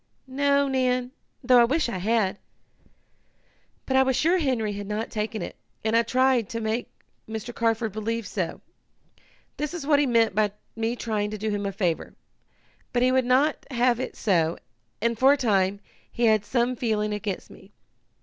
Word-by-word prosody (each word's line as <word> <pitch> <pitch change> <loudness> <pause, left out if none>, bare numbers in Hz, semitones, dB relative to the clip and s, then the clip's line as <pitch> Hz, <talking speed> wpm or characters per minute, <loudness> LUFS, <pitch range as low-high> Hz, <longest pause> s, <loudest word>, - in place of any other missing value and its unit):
"No, 280 +1 +2
Nan, 255 -1 0 0.3
though 250 -2 +6
I - - +6
wish 290 +5 +1
I 235 -6 -3
had. 205 -1 +1 1.5
But 265 - -1
I 265 - +6
was 265 -1 +2
sure 335 +8 +3
Henry 245 -9 0
had 205 0 -6
not 210 +2 -3
taken 215 0 -3
it, - - -7 0.3
and 220 +1 +2
I 230 - +6
tried 255 -1 +2
to 230 - -3
make 225 +2 -2 0.4
Mr. 220 +2 -5
Carford 225 -1 0
believe 220 +2 -3
so. 185 -3 -4 1.0
That 300 0 -2
is 325 -5 -5
what 290 -1 +4
he 290 - +2
meant 230 -4 +3
by 210 0 +1 0.2
me 225 +1 -1
trying 215 -3 -2
to 215 - -5
do 215 +1 -2
him 205 -1 -2
a - - -2
favor. 185 -5 -2 0.8
But 245 0 +1
he 255 - +4
would 260 -1 +2
not 270 +5 +2
have 245 -2 +2
it 260 - -4
so, 170 -5 +1 0.5
and, 235 -1 0
for 270 +2 +6
a - - 0
time, 200 -5 +1 0.3
he 240 - 0
had 215 -2 +3
some 245 +2 0
feeling 215 -3 -1
against 210 -2 -4
me. 195 - -16
230 Hz, 180 wpm, -25 LUFS, 210-255 Hz, 1.5 s, though